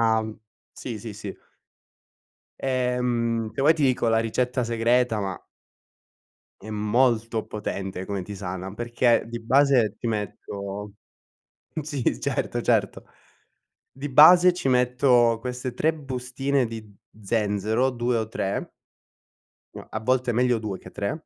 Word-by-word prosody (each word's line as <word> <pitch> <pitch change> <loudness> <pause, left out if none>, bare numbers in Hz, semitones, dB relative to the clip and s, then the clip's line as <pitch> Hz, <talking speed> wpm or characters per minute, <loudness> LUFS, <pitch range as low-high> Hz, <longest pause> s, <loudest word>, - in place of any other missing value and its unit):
tisana 110 -1 +3 0.5
sì, 115 -4 -6
sì, 110 +1 -7
sì. 105 -2 -7 1.2
Ehm, 125 -3 0
se 135 - -3
vuoi 150 +4 +6
ti 155 -2 -1
dico 130 -3 +2
la 115 0 +3
ricetta 125 +3 0
segreta, 115 0 +1
ma 95 -2 -3 1.2
è 110 - -10
molto 110 +1 +1
potente 95 -3 -5
come 100 -1 -3
tisana 95 -1 -6
perché 120 +1 +2
di 120 0 -5
base 130 -3 +3
ti - - -3
metto 100 -1 -5 0.9
sì, 140 - -2
certo, - - -2
certo. - - 0 0.9
Di 140 +2 -6
base, 175 +6 +8
ci 175 -6 -3
metto 125 -2 +3
queste 125 0 -5
3 155 +5 +2
bustine 135 -1 -2
di 110 -2 -9 0.3
zenzero, 110 +4 0
2 120 0 -1
o 110 -1 -3
3. 100 -3 -2 1.1
No, - - -9
a 110 - -4
volte 125 +2 +1
meglio 120 0 +2
2 105 -3 -4
che - - -13
3. 140 +11 -4
115 Hz, 125 wpm, -25 LUFS, 105-130 Hz, 1.2 s, base